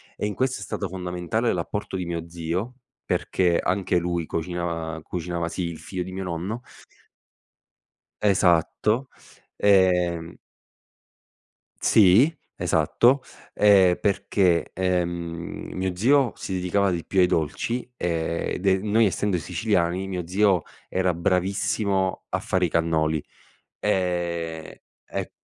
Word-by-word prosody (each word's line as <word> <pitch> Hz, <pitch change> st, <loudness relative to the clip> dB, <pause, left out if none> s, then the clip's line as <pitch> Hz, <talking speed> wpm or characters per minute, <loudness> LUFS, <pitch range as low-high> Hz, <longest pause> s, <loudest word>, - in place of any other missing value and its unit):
e, -, -, -3 dB
in 105 Hz, -, -2 dB
questo, 130 Hz, +3 st, -1 dB
è -, -, -4 dB
stato 100 Hz, -, -3 dB
fondamentale 90 Hz, +5 st, -2 dB
l'apporto 95 Hz, +2 st, -3 dB
di 90 Hz, -, -3 dB
mio 85 Hz, -1 st, -4 dB
zio, 85 Hz, +8 st, -3 dB, 0.3 s
perché 90 Hz, -2 st, +1 dB
anche 95 Hz, -1 st, 0 dB
lui 85 Hz, -1 st, -1 dB
cocina 85 Hz, -1 st, -3 dB
cucinava 85 Hz, -1 st, -3 dB
sì 90 Hz, -, -3 dB
il 85 Hz, -1 st, -5 dB
figlio 90 Hz, -2 st, -5 dB
di 95 Hz, +1 st, -8 dB
mio 95 Hz, 0 st, -4 dB
nonno. 90 Hz, +7 st, -4 dB, 1.6 s
Esatto, 100 Hz, +6 st, +2 dB, 0.5 s
ehm 90 Hz, -4 st, +3 dB, 1.5 s
Sì, 110 Hz, -, +6 dB, 0.3 s
esatto, 130 Hz, +3 st, +3 dB, 0.3 s
ehm, 95 Hz, -4 st, +5 dB
perché, 100 Hz, -4 st, +1 dB
ehm, 85 Hz, -2 st, -2 dB
mio 95 Hz, -1 st, -2 dB
zio 130 Hz, +4 st, +3 dB
si 95 Hz, -, -5 dB
dedicava 95 Hz, +2 st, +1 dB
di 85 Hz, -2 st, -2 dB
più 95 Hz, -, -1 dB
ai -, -, +7 dB
dolci 90 Hz, -, -1 dB
e 85 Hz, 0 st, -2 dB
de 95 Hz, -1 st, +3 dB
noi 105 Hz, +2 st, +3 dB
essendo 95 Hz, -1 st, 0 dB
siciliani, 90 Hz, 0 st, 0 dB
mio 90 Hz, -3 st, -4 dB
zio 95 Hz, -1 st, +3 dB, 0.3 s
era 95 Hz, -1 st, +1 dB
bravissimo 95 Hz, +2 st, 0 dB
a -, -, -1 dB
fare 90 Hz, -1 st, 0 dB
i -, -, -1 dB
cannoli. 80 Hz, -2 st, +1 dB, 0.6 s
Ehm, 85 Hz, -4 st, -1 dB, 0.3 s
e -, -, -5 dB
90 Hz, 120 wpm, -24 LUFS, 85-100 Hz, 1.6 s, ai